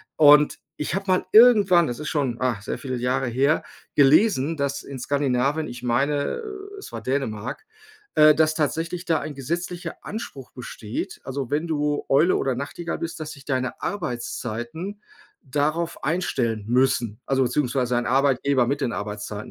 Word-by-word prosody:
Und 150 -1 +6 0.2
ich 150 - -2
habe 195 +1 -2
mal 185 -1 +2
irgendwann, 205 -7 +7
das 120 - -4
ist 150 - -4
schon, 135 -6 -1
ah, 125 -5 0
sehr 105 - -4
viele 130 -2 -4
Jahre 125 +2 0
her, 135 +6 +2 0.3
gelesen, 155 +1 +4
dass 140 0 -1
in 140 - -8
Skandinavien, 140 +3 0
ich 120 0 -9
meine, 140 - 0
äh, 405 -1 -8
es - - -10
war - - -6
Dänemark, 130 - -3 0.5
äh, 155 0 +7
dass 155 0 +3
tatsächlich 165 +3 -2
da 160 -2 +2
ein 155 -2 -6
gesetzlicher 170 +6 -4
Anspruch 175 - -7
besteht. 115 -3 -6
Also, 135 -1 -4
wenn 155 +3 0
du 150 -2 0
Eule 155 +7 +4
oder 135 -2 0
Nachtigall 145 +6 -4
bist, 165 0 -5
dass 155 0 -5
sich 140 -3 -12
deine 130 -2 -2
Arbeitszeiten 155 - -4 0.4
darauf 155 +4 -1
einstellen 130 - -1
müssen. 120 -3 +1
Also, 135 -1 +2
beziehungsweise 125 -1 0
ein 120 - -1
Arbeitgeber 135 -1 +2
mit 140 +3 -1
den 125 - 0
Arbeitszeiten, 105 +1 -5
140 Hz, 160 wpm, -24 LUFS, 125-160 Hz, 0.5 s, irgendwann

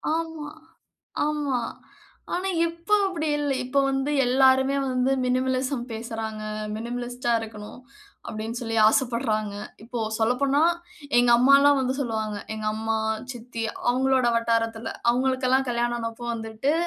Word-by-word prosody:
ஆமா, 320 -2 -4 0.8
ஆமா. 295 -4 0 0.8
ஆனா 370 +2 -1 0.2
இப்ப 335 +2 -9 0.2
அப்படி 330 -5 -2
இல்ல. 290 -1 0
இப்ப 255 +3 0
வந்து 270 +1 -1 0.2
எல்லாருமே 265 +1 +4
வந்து 255 +1 +1
மினிமலிசம் 255 0 0
பேசுறாங்க. 220 -1 -5 0.3
"மினிமலிஸ்ட்டா 240 +1 -3
இருக்கணும்." 215 +1 -9 0.5
அப்படீன்னு 220 +2 -4
சொல்லி 225 -2 -3
ஆசைப்படுறாங்க. 220 -3 +1 0.3
இப்போ 240 +1 -5 0.2
சொல்லப்போனா, 270 +6 +2 0.6
எங்க 245 0 +4
அம்மால்லாம் 275 +2 +6
வந்து 260 0 0
சொல்லுவாங்க 220 -4 -2 0.2
எங்க 215 0 -5
அம்மா, 220 +1 -1 0.4
சித்தி 235 -1 -7 0.3
அவங்களோட 260 0 +2
வட்டாரத்தில, 230 0 0 0.2
அவங்களுக்கெல்லாம் 260 +1 +1
கல்யாணம் 240 0 0
ஆனப்ப 230 +1 -5
வந்துட்டு, 225 +4 -2
245 Hz, 115 wpm, -25 LUFS, 225-270 Hz, 0.8 s, அம்மால்லாம்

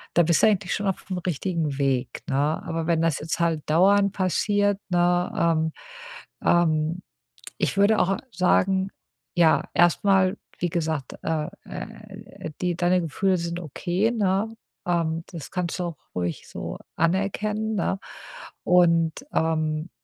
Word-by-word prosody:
Da 170 - +6
bist 170 0 +3
du - - +8
eigentlich 195 -3 +1
schon 205 0 -2
auf'm 185 -1 -3
richtigen 165 -3 -1
Weg, 135 -3 0
ne? 135 - 0 0.3
Aber 165 0 -3
wenn 165 -1 +2
das 165 -3 +1
jetzt 155 +3 -3
halt 165 -2 +1
dauernd 200 +5 +4
passiert, 205 +2 +1
ne? 175 0 +2
Ähm, 160 -1 +2 0.7
ähm 165 0 +2 0.6
ich - - 0
würde 205 +2 +4
auch 195 +2 +2
sagen 190 +2 +2 0.5
ja, 165 -2 +4
erstmal, 185 +3 +4 0.2
wie 175 - +1
gesagt, 160 -5 -2
äh, 155 0 -1 0.2
äh, 205 -3 -9
die 180 -1 0
deine 180 +1 +2
Gefühle 185 +4 +1
sind 170 0 -3
okay, 180 - -1
ne, 200 -1 +1 0.4
ähm, 165 -1 0
das 165 -5 -8
kannst 180 -2 -2
du - - 0
auch 170 - -5 0.2
ruhig 90 -2 -3
so - - -6 0.2
anerkennen, 210 +5 0
ne? 195 -1 0 0.7
Und, 170 -2 +4 0.2
ähm, 155 0 0
175 Hz, 140 wpm, -25 LUFS, 160-195 Hz, 0.7 s, du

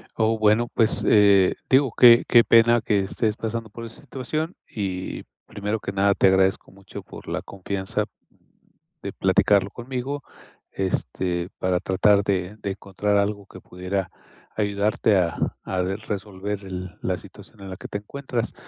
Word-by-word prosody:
Oh, 110 0 +1
bueno, 110 +2 +3
pues, 115 -1 +2
eh, 100 -3 +5 0.2
digo 130 -2 +4
que 120 -1 +8
qué 120 -1 +6
pena 115 0 +5
que 105 -2 +1
estés 105 +2 -1
pasando 115 -1 -4
por 115 - -9
esta 115 0 -9
situación, 155 +5 -4 0.2
y 95 -3 -4 0.2
primero 105 +2 -3
que 100 - -5
nada, 100 +1 +2
te 95 - +3
agradezco 95 0 +2
mucho 95 0 -10
por - - -13
la - - -3
confianza 95 0 -3 1.0
de - - -4
platicarlo 100 -1 +3
conmigo, 130 +3 -5 0.5
este, 90 -2 -2
para 90 -1 +1
tratar 100 +2 +3
de 95 +1 -2
de 100 - -3
encontrar 100 +1 -1
algo 100 0 -1
que 95 - -12
pudiera 90 +1 -4 0.4
ayudarte 105 0 +1
a 85 -2 -1
a 95 -1 -2
resolver 100 0 -4
el 90 -1 -7
la 90 -1 -1
situación 100 +2 -15
en 95 - -8
la 95 - -7
que - - -9
te - - -4
encuentras. 120 +1 -4
100 Hz, 155 wpm, -24 LUFS, 95-115 Hz, 1.0 s, que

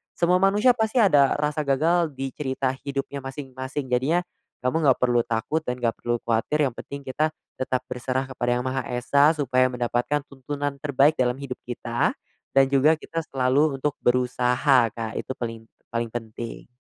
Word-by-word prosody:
Semua 180 +1 +3
manusia 205 +6 +4
pasti 220 0 -1
ada 150 - +5
rasa 150 +1 -1
gagal 160 +3 +2
di 135 0 -4
cerita 130 -1 -2
hidupnya 140 +1 -4
masing-masing, 135 0 -6
jadinya 150 +8 +2 0.4
kamu 145 +3 +2
nggak 130 - +4
perlu 120 -1 +3
takut 120 +8 -1
dan 125 0 -1
nggak 120 -2 0
perlu 120 0 0
kuatir, 115 +7 +1
yang 130 - -2
penting 140 +3 -8
kita 150 +4 0 0.3
tetap 130 -1 -1
berserah 130 +1 -2
kepada 120 -2 -1
Yang 125 - -2
Maha 130 +1 -1
Esa 125 +4 +2
supaya 130 -2 +2
mendapatkan 125 +4 -1
tuntunan 140 +1 -5
terbaik 140 +1 +3
dalam 125 -1 +2
hidup 135 -2 -6
kita, 120 -1 -1 0.4
dan 135 0 +7
juga 145 +4 +5
kita 165 +1 -4
selalu 135 +3 +2
untuk 145 +2 -1
berusaha 125 +1 +3
Kak, 110 0 -5
itu - - -5
paling 115 -2 -5 0.3
paling 115 0 -1
penting. 115 0 -7
130 Hz, 165 wpm, -25 LUFS, 125-145 Hz, 0.4 s, dan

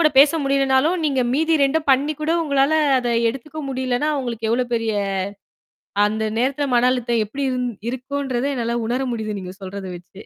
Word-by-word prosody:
கூடப் 305 -4 +3
பேச 285 +1 +6
முடியலனாலும், 275 +4 +2
நீங்க 275 -4 +1
மீதி 320 +3 +2
2ம் 305 +3 0
பண்ணிக் 280 +3 +2
கூட 315 +2 +1
உங்களால 280 0 +2 0.3
அத 245 -1 -1 0.2
எடுத்துக்க 290 +5 -8
முடியலன்னா, 260 +1 -1
உங்களுக்கு 230 -3 -3
எவ்ளோ 245 +2 +2
பெரிய 225 -1 0 1.1
அந்த 215 +1 -1
நேரத்துல 275 +4 0
மன 245 +1 +4
அழுத்தம் 240 -3 0
எப்படி 275 +7 -4
இருந் 250 -1 -1 0.2
இருக்குன்றத 260 0 -3
என்னால 235 -1 -1
உணர 245 +3 0
முடியுது, 215 -2 -3
நீங்கச் 185 +2 -9
சொல்றத 190 +1 -6
வச்சே. 190 +3 -14
255 Hz, 165 wpm, -21 LUFS, 235-280 Hz, 1.1 s, பேச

